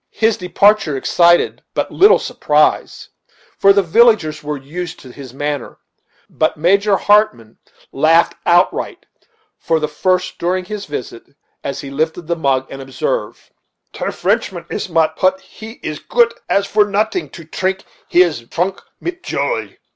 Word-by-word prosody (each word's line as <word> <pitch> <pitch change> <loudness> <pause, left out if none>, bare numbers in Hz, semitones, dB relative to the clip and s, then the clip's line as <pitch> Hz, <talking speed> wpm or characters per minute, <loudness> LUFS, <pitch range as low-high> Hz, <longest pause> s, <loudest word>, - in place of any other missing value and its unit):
His 225 -1 +2
departure 185 -4 +2
excited 170 +5 +3
but - - -1
little 405 +3 +6
surprise, - - 0 0.5
for 195 - +6
the 200 0 +3
villagers 190 -5 +3
were 150 0 -3
used 160 +6 -7
to 130 - -12
his 135 -1 -11
manner; 145 +2 -4 0.5
but 155 0 -1
Major 195 +5 +3
Hartmann 205 - +1 0.3
laughed 160 +4 +3
outright, 175 +1 +1 0.5
for 160 - 0
the 155 - -1
first 185 +4 -1
during 180 +2 -1
his 205 +1 -6
visit, 130 -3 -8 0.3
as 140 - -4
he 135 - -8
lifted 160 +4 -2
the 170 +2 -1
mug, 135 -5 0
and 135 - -7
observed: - - -4 0.4
"Ter - - -3
Frenchman - - -1
is - - -4
mat 160 -1 +1
put 185 0 +2
he 220 +3 -12
is 155 -1 -4
goot 235 -1 +2 0.2
as 200 0 +2
for 210 +1 +3
noting 215 - -1
to 170 - -12
trink: 190 +4 -2 0.2
he 180 - +5
is 145 -10 -4
trunk 185 +3 -2 0.2
mit 350 +1 -5
joy." - - -3
175 Hz, 150 wpm, -17 LUFS, 150-205 Hz, 0.5 s, little